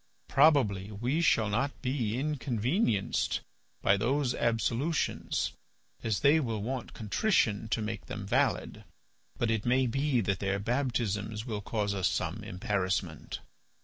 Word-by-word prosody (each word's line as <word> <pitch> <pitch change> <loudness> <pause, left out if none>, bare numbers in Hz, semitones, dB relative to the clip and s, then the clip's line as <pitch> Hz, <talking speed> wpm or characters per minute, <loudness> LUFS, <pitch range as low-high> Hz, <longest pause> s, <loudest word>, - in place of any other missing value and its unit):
Probably 130 -10 +4
we 125 +10 0
shall 115 -9 +3
not 125 +7 -1
be 125 -4 -1
inconvenienced 130 - 0 0.4
by 100 - +5
those 125 +4 +1
absolutions 120 +7 0 0.5
as 110 -4 -1
they 145 +3 +6
will 115 -7 -2
want 130 +2 -4
contrition 110 - +1
to 110 0 -1
make 110 0 -5
them 105 -2 -5
valid, - - 0 0.5
but 120 -1 +1
it 110 -2 0
may 130 +2 +3
be 135 +1 +1
that 95 -2 0
their 100 0 0
baptisms 110 -2 -1
will 110 -4 -3
cause 105 -1 -1
us 95 -2 +1
some - - -2
embarrassment. 95 -3 -2
115 Hz, 130 wpm, -30 LUFS, 105-135 Hz, 0.5 s, they